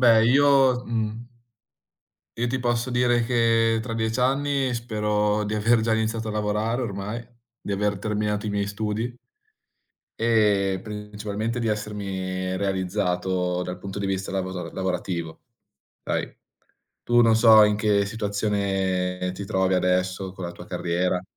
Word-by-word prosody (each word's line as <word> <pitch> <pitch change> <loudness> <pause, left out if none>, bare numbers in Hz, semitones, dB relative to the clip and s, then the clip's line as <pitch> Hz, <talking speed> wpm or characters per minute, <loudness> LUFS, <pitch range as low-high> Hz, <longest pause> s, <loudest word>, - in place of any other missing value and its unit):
Beh 115 -3 +6
io 135 -1 +4
mhmm 115 0 -3 1.1
io 120 +1 0
ti 130 +2 -1
posso 120 0 0
dire 120 -1 +2
che 115 -2 +2
tra 115 0 -5
10 110 +1 -1
anni 135 0 +1
spero 105 -2 0
di 105 +1 -3
aver 110 +2 +3
già 115 0 +1
iniziato 110 0 -1
a - - -3
lavorare 105 +3 -1
ormai, 105 +1 -4 0.4
di 100 - -4
aver 100 0 0
terminato 105 0 -1
i - - -1
miei 100 0 -1
studi 110 +4 -3 1.0
e 105 -4 +2
principalmente 105 +2 -4
di 115 - -1
essermi 95 -3 -3
realizzato 90 -2 -1
dal 90 0 -5
punto 100 0 -7
di 100 - -2
vista 95 0 -2
lavoza 95 -1 -3
lavorativo. 90 -3 -3 0.6
Hai, - - -3 0.7
tu 120 0 +4
non 115 -1 +5
so 110 -1 +8
in 105 0 +2
che 105 -1 +2
situazione 100 -3 -1
ti 100 +2 -6
trovi 95 0 +1
adesso 90 +1 0
con 95 -1 -7
la 85 - -5
tua - - -11
carriera. 90 +1 -1
105 Hz, 140 wpm, -24 LUFS, 95-115 Hz, 1.1 s, so